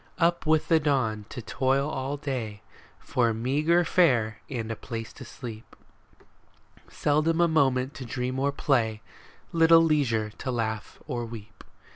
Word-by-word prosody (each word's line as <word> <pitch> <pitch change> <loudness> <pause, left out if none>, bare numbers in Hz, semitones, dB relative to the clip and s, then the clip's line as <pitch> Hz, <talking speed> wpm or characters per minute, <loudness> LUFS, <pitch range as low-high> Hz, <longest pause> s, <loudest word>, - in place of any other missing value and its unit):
Up 170 -2 +1
with 155 0 +3
the 165 -1 +4
dawn 125 -8 0
to 125 - -7
toil 135 +4 +1
all 135 0 -3
day 120 -8 -4 0.3
For 115 -3 0
meagre 150 +9 +2
fare 120 -13 +2
and 115 -4 -4
a - - -2
place 115 0 -7
to - - -10
sleep; 115 -3 -9 1.1
Seldom 155 +3 +1
a 170 - +5
moment 135 -4 +2
to 130 - -7
dream 125 +2 -3
or 140 +1 +1
play, 115 -6 0 0.5
Little 165 0 +6
leisure 120 -9 +1
to 130 - -4
laugh 110 -3 -3
or 125 -5 -3
weep. 115 -1 -11
130 Hz, 145 wpm, -27 LUFS, 115-150 Hz, 1.1 s, Little